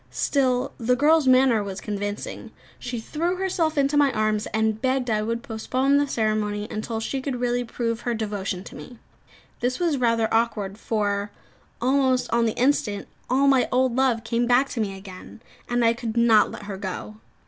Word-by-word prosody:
Still, 260 -2 0
the 250 +1 +2
girl's 300 +2 +4
manner 255 -4 +5
was 195 -1 -5
convincing. 205 0 -5 0.3
She 250 -1 -4
threw 335 +10 -2
herself 355 -4 -1
into 280 +1 +2
my 290 -2 +4
arms, 215 -1 0
and 220 0 0
begged 260 -2 0
I 215 -1 +1
would 230 +2 -3
postpone 255 +5 0
the 285 0 +2
ceremony, 215 -3 -1
until 220 +1 -3
she 265 +4 -3
could 260 -2 -3
really 245 0 0
prove 230 -1 -3
her 240 -1 -2
devotion 200 -4 -3
to - - -11
me. 245 - -11 0.6
This 250 +1 -1
was 335 -5 +1
rather 230 -3 +2
awkward; 215 -3 0
for, 205 -2 -1 0.5
almost 260 0 +1
on 235 -1 +3
the 220 - -3
instant, 240 -6 +1 0.2
all 265 +3 +3
my 270 -2 +4
old 255 -1 +2
love 255 -4 +2
came 235 +1 0
back 250 +3 +3
to 240 - -3
me 195 -2 -3
again, 190 +2 -11 0.3
and 240 -1 +2
I 230 - +4
could 235 -1 -5
not 230 -2 +5
let - - -9
her 200 -2 -6
go. 200 +2 -6
235 Hz, 180 wpm, -24 LUFS, 215-260 Hz, 0.6 s, manner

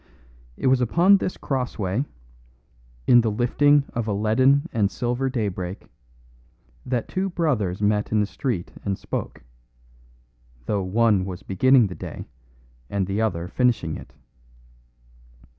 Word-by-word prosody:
It - - -5
was 130 -1 +4
upon 175 - +5
this 185 - -3
crossway, 125 -3 -2 1.0
in 120 -1 +6
the 115 - 0
lifting 140 +6 +3
of 115 -2 -2
a 105 - 0
leaden 130 +9 +3
and 105 -3 +2
silver 125 +4 -2
daybreak, 100 -7 -4 1.0
that 125 -3 -1
two 190 +1 -2
brothers 115 - -1
met 105 0 +1
in 110 - +2
the 105 - +2
street 110 -4 -3
and 100 -1 -2
spoke; - - -5 1.2
though 100 +5 0
one 105 +1 +2
was 95 0 -7
beginning 125 +6 +4
the 95 - -4
day - - -8 0.6
and 100 -2 -1
the 100 +3 -2
other 90 -6 -1
finishing 115 -8 0
it. - - -10
110 Hz, 130 wpm, -24 LUFS, 100-130 Hz, 1.2 s, in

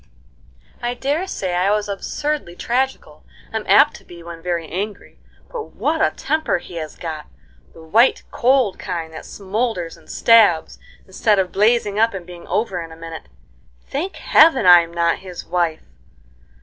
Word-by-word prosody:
I 240 0 -2
dare 290 +9 -1
say 185 - -3
I 180 +2 +2
was 210 0 +1
absurdly 205 +1 -3
tragical, 260 +7 -2 0.3
I'm - - -3
apt - - +5
to - - -19
be 170 -1 -13
when 170 -1 -9
very 170 -2 -2
angry, 200 +6 -6 0.3
but 465 -3 -7
what - - 0
a - - +4
temper 315 -8 -1
he 175 0 -10
has 155 -2 -6
got! 155 -3 -6 0.5
The 165 - -13
white, 225 +11 +3
cold 255 -5 +2
kind, 165 -2 -5
that 155 - -9
smoulders 195 -4 -3
and 160 - -21
stabs, 215 -9 +4 0.3
instead 205 +2 +1
of 185 -2 0
blazing 210 0 +2
up 225 -1 +3
and 180 -3 -7
being 175 -1 -12
over 195 -2 -1
in 165 -1 -9
a 160 - -12
minute. 165 - -9 0.6
Thank 350 +8 -3
Heaven, 310 - +4
I'm 175 -2 +7
not 170 0 +1
his 185 -2 -9
wife! 170 -2 -1
190 Hz, 160 wpm, -20 LUFS, 170-235 Hz, 0.6 s, I'm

